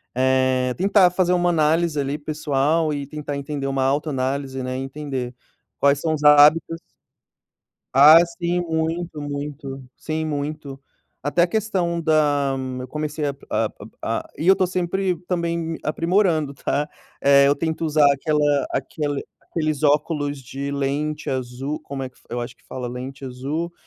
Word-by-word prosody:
eh, 130 0 +2
tentar 195 0 +5
fazer 180 0 +1
uma 175 0 +2
análise 160 -1 +2
ali 140 +1 -1
pessoal 150 +1 0
e 140 -1 -3
tentar 150 0 -5
entender 140 0 -4
uma 135 -1 0
autoanálise, 135 -1 -1
né, 130 0 -3
e - - -3
entender 135 -2 -5 0.5
quais 140 0 +4
são 160 -1 0
os 150 -1 -3
hábitos 150 +3 +6 1.1
ah 150 +5 +9 0.2
sim, 175 0 0
muito, 165 0 -2
muito, 145 -1 -6
sim, 160 0 -3
muito. 145 -2 -4 0.4
Até 145 +5 +1
a 175 - +4
questão 185 -4 -1
da 150 -4 +2 0.3
eu 125 - -6
comecei 150 +2 -3
a 140 - -3
a - - 0 0.3
a - - -2
e 160 - -3
eu 190 - +9
estou 185 -1 +1
sempre 185 +1 -1
também 170 -2 -2
aprimorando 165 -2 +1
tá, 145 +2 -1 0.3
eh, 140 0 +6
eu 140 - +3
tento 160 +1 -2
usar 155 -1 +4
aquela 145 0 +1
aquele 145 -3 -2 0.2
aqueles 155 -3 -2
óculos 145 0 +1
de 140 +2 -5
lente 145 +2 -2
azul, 130 +3 -3
como 135 -1 -6
é 130 - -5
que 130 - -29
eu 120 - -3
acho 120 - -6
que - - -32
fala, 125 -1 -5
lente 130 +3 -7
azul, 140 +7 -4
150 Hz, 155 wpm, -22 LUFS, 135-160 Hz, 1.1 s, ah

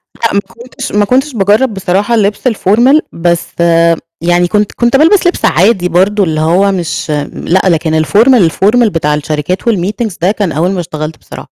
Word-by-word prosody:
لأ، 230 - -2
ما 200 - +2
كنتش 240 +5 -9
ما 205 0 +1
كنتش 265 +6 0
باجرَّب 215 +3 +1
بصراحة 195 +4 -1
اللبس 210 +3 0
الformal 240 +6 +2
بس 170 0 -1 0.7
يعني 175 +1 +1
كنت 210 +2 0
كنت 240 +1 0
بالبس 345 +6 +3
لبس 350 - -1
عادي، 180 +1 +2
برضه 195 +4 +1
اللي 160 -4 -2
هو 185 +5 +2
مش 175 -4 -4 0.2
لأ، 185 +3 0
لكن 160 -2 +1
الformal 215 - +3
الformal 230 +7 +2
بتاع 165 -6 -1
الشركات 150 +7 -3
و - - +4
الmeetings 205 +2 -3
ده 180 +3 +2
كان 205 -5 -2
أول 165 +5 -1
ما 190 - -3
اشتغلت 155 -2 -6
بصراحة، - - -12
195 Hz, 175 wpm, -11 LUFS, 170-225 Hz, 0.7 s, و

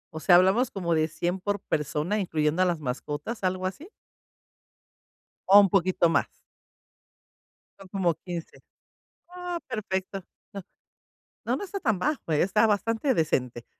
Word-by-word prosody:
O 160 - -4
sea, 175 +2 +5
hablamos 195 +8 +4
como 175 -4 -2
de 155 -1 +2
100 175 +4 -3
por 205 +1 -2
persona, 150 +8 -2
incluyendo 160 -2 0
a - - +5
las 175 -3 0
mascotas, 150 - -5
¿algo 185 0 -1
así? 285 - -5 1.6
¿O 200 +1 +9
un 200 -2 +5
poquito 185 -2 +2
más? - - +2 1.5
Son 195 - -12
como 180 -3 0
15. 175 -3 -7 0.7
Oh, 355 -1 -5
perfecto. 195 -2 -4 0.3
No 200 -1 -7 0.8
no, 245 - +1
no 350 - -5
está 395 0 -5
tan 220 - +1
bajo, 290 - -2
¿eh? 150 - +2
Está 210 +4 +3
bastante 225 +6 +1
decente. 125 - -1
185 Hz, 145 wpm, -26 LUFS, 165-210 Hz, 1.6 s, O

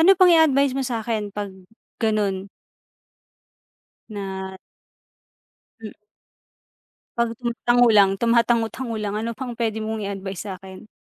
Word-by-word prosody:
Ano 335 +4 +7
pang 370 -1 +6
i-advice 280 -5 +4
mo 270 - 0
sa'kin 220 -3 -3
'pag 205 -1 -4 0.5
ganun. 205 -4 0 1.6
Na 190 -2 -5 1.3
hmm. 215 -2 -8 1.2
'Pag 235 -1 +1
tumatango 240 0 +3
lang 200 -2 +6
tumatango-tango 235 0 +1
lang, 210 0 -3
ano 225 +2 -2
pang 245 -2 -6
pwede 220 -2 -1
mong 215 -1 -3
i-advice 195 -1 -5
sa'kin? 190 +2 -11
220 Hz, 110 wpm, -23 LUFS, 200-240 Hz, 1.6 s, Ano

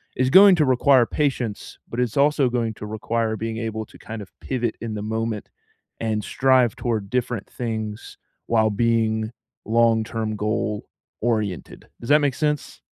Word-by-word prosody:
is 130 +1 +1
going 195 0 +9
to 155 -4 +3
require 130 0 +4
patience, 125 -7 -2
but 115 - -5
it's 125 0 -1
also 140 -2 +3
going 115 -2 -1
to 105 - -8
require 110 +1 -1
being 115 0 -4
able 110 -1 -3
to - - -17
kind 110 0 -7
of 95 - -16
pivot 120 -4 -2
in 110 -2 -4
the 105 - -4
moment 110 -1 -3 0.5
and 110 -2 -1
strive 130 -4 +3
toward 110 -5 -2
different 120 -4 -2
things 110 -3 -5 0.3
while 110 -1 +3
being 110 0 +1 0.4
long-term 110 -1 +1
goal 105 0 -2 0.4
oriented. 105 -6 -2
Does 120 - -8
that 150 - +6
make 145 -3 +1
sense? 150 +1 -2
115 Hz, 160 wpm, -23 LUFS, 110-125 Hz, 0.5 s, going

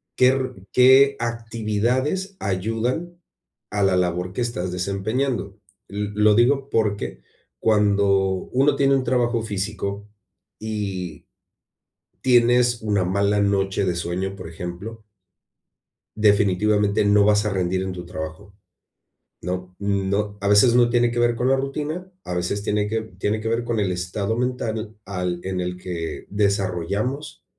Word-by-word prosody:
qué 125 0 +5
ru 130 -1 -2 0.2
qué 130 +2 +6
actividades 120 - -1
ayudan 115 - -2 0.5
a 105 -1 0
la 95 -1 +3
labor 90 0 -1
que 110 - -3
estás 95 -7 -2
desempeñando. 100 +4 -2 0.3
L 105 0 -3
lo 105 0 +5
digo 135 +4 +3
porque 105 - -1 0.4
cuando 105 -2 +3 0.5
uno 135 +3 +3
tiene 140 0 +3
un 135 - +1
trabajo 120 -1 +1
físico 100 -1 -4 0.5
y 100 -5 -4 1.0
tienes 120 -1 +4
una 105 -3 +1
mala 100 +2 +1
noche 100 0 +1
de 90 -2 0
sueño, 90 +3 -3
por 90 -3 -8
ejemplo 90 +7 -7 1.1
definitivamente, 105 0 +3
no 100 0 +5
vas 105 0 +3
a 105 - +1
rendir 95 -1 0
en 95 -1 -4
tu 90 -1 -7
trabajo. 80 +4 -7 0.9
No 90 +1 -5
no, 100 +1 -1
a 100 - -1
veces 105 +4 +6
no 120 -1 +4
tiene 120 0 +2
que 120 - -1
ver 120 0 +2
con 125 +2 0
la 135 - +4
rutina, 150 +7 -4
a 90 - -4
veces 90 +3 -2
tiene 105 -1 0
que 110 +2 0
v 110 -4 -12
tiene 105 +2 0
que 110 - -7
ver 115 +1 0
con 120 -1 -1
el 100 -3 +1
estado 90 +4 -2
mental 115 -3 -3
al 90 -2 -3
en 95 -1 -2
el 90 0 -3
que 90 -2 -5
desarrollamos 100 - -1
105 Hz, 145 wpm, -23 LUFS, 95-120 Hz, 1.1 s, qué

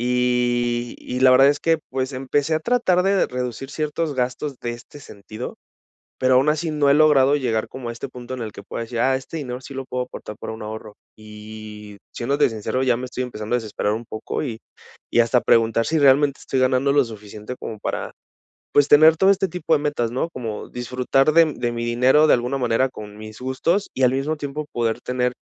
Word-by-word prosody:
Y 120 -1 0
y 125 - -5
la 130 0 +6
verdad 135 +2 +7
es 145 0 +2
que, 165 -1 +2
pues, 130 +1 -2
empecé 135 +4 0
a 155 - 0
tratar 190 -5 +2
de 195 0 +2
reducir 125 +1 -5
ciertos 150 +1 -2
gastos 130 +3 -2
de 120 - -2
este 120 +5 -10
sentido, 110 -1 -9 0.6
pero 130 0 +3
aun 135 +4 +4
así 155 +1 -1
no 150 -2 +2
he - - +6
logrado 145 -2 +5
llegar 115 -6 -1
como 125 -2 -7
a - - -3
este 120 +4 -7
punto 125 0 -8
en 125 - -5
el 110 -2 -6
que - - -10
pueda 115 - -6
decir: 115 0 -4
"Ah, 130 +2 +3
este 135 +5 -7
dinero 125 -3 -6
sí 140 - -10
lo 135 -1 -6
puedo 125 0 -2
apartar 105 -4 -9
para - - -6
un 110 - -9
ahorro". 110 0 -7 0.2
Y, 105 -1 -10 0.2
siéndote 140 +3 +1
sincero, 110 +4 -2
ya 125 -3 +2
me 130 - -5
estoy 125 - -4
empezando 110 -2 -4
a - - +5
desesperar 105 -2 -2
un 115 +2 -5
poco 110 +5 -5
y 115 -6 -4 0.5
y 120 - +4
hasta 120 +2 +3
preguntar 115 0 +2
si 160 - +1
realmente 140 0 +4
estoy 135 - -2
ganando 130 +2 +2
lo 145 0 +5
suficiente 105 0 -9
como 110 - -7
para, - - -4 0.6
pues, 145 0 +4
tener 155 +2 +7
todo 190 - +4
este 195 0 +2
tipo 165 -1 0
de 150 - +1
metas, 145 -6 -1
¿no?, 130 +7 -2
como 115 -7 -6
disfrutar 125 +4 +1
de 165 0 +7
de 120 -1 -2
mi 120 0 -3
dinero 125 +6 +4
de - - +5
alguna 125 +3 -1
manera 125 +1 +1
con 105 -4 -10
mis 110 0 -10
gustos 135 +10 -1
y 130 - +1
al 125 - +4
mismo 140 +4 -1
tiempo 145 +1 -4
poder 115 -2 -1
tener 125 0 -1
125 Hz, 215 wpm, -22 LUFS, 115-145 Hz, 0.6 s, verdad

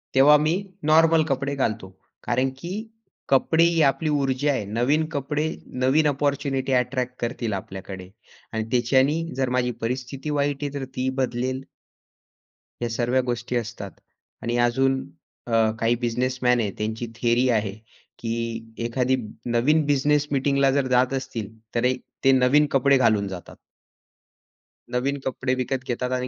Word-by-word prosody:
तेव्हा 145 +3 +7
मी 155 +2 +1 0.4
नॉर्मल 160 0 +5
कपडे 140 +1 -1
घालतो, 110 -7 -2 0.3
कारण 130 +1 +1
की 170 +6 -7 0.6
कपडे 160 +5 +4
ही 170 -1 +3
आपली 140 +3 +2
ऊर्जा 140 -1 +1
आहे. 120 -7 -2
नवीन 125 +10 +1
कपडे 145 +3 -1 0.4
नवीन 150 +4 +4
अपॉर्च्युनिटी 140 -1 0
अ‍ॅट्रॅक्ट 125 0 0
करतील 120 -2 -2
आपल्याकडे 95 -1 -7 0.4
आणि 110 - -1
त्याच्याने 130 +5 +3 0.2
जर 130 -1 +1
माझी 125 -1 +1
परिस्थिती 130 +4 -4
वाईट 145 -1 0
आहे 145 -1 -3
तर 140 -2 -4
ती 130 +1 0
बदलेल. 130 +1 -1 1.2
या 120 - -1
सर्व 120 +3 +1
गोष्टी 120 0 -3
असतात. 115 -4 -4 0.5
आणि 120 +1 -1
अजून 135 +2 +1 0.5
अ, 115 -1 +3
काही 115 +1 +2
बिझनेसमॅन 125 +1 0
आहेत 105 -4 -1
त्यांची 110 +2 -3
थियरी 120 +2 +2
आहे 110 -4 +1 0.5
की 115 -1 -4
एखादी 125 +2 +1 0.3
नवीन 135 +7 +2
बिझनेस 145 +1 +2
मीटिंगला 140 0 +2
जर 135 -1 +1
जात 125 +1 +2
असतील 120 -6 -4 0.3
तर 120 +1 +1 0.4
ते 135 - +6
नवीन 130 +3 +4
कपडे 135 +1 +4
घालून 110 -5 +3
जातात. 95 -3 -8 1.4
नवीन 140 +3 0
कपडे 130 0 -1
विकत 130 +1 -2
घेतात 125 +1 -2
आणि 125 - -3
130 Hz, 140 wpm, -24 LUFS, 120-140 Hz, 1.4 s, तेव्हा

